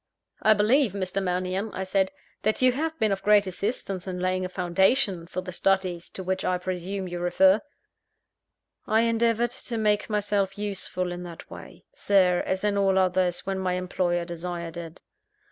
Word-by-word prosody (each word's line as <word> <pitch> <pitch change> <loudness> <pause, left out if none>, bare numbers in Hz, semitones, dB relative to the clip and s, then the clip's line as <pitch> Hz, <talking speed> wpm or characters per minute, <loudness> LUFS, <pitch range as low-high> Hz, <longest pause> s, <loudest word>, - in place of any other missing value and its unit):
"I 215 0 +5
believe, 220 +2 +3
Mr. 195 -1 -2
Mannion," 185 +3 -1
I 190 - -2
said, 190 0 +1 0.3
"that 215 +1 0
you 255 0 +5
have 320 +5 -2
been 220 -6 +1
of 195 - -1
great 210 -1 +5
assistance 195 0 -3
in 180 -1 -4
laying 185 0 0
a 185 - -3
foundation 185 +1 +1
for 185 - -4
the 180 0 -7
studies 185 -1 0
to 190 - -7
which 190 +1 -2
I 185 - +1
presume 185 +1 -4
you 175 0 -5
refer." 190 +3 +4 1.3
"I 220 +1 +3
endeavoured 230 0 +2
to 235 - -5
make 210 -1 +1
myself 205 -2 0
useful 190 -3 -2
in 175 0 -5
that 170 -2 -10
way, - - -11
Sir, 185 - +3
as 190 +1 -1
in 205 -1 +1
all 195 -1 +3
others, 185 -1 +1
when 195 -1 -2
my 185 -1 0
employer 180 -1 -1
desired 170 -1 -5
it." 170 -1 -8
190 Hz, 175 wpm, -26 LUFS, 180-205 Hz, 1.3 s, I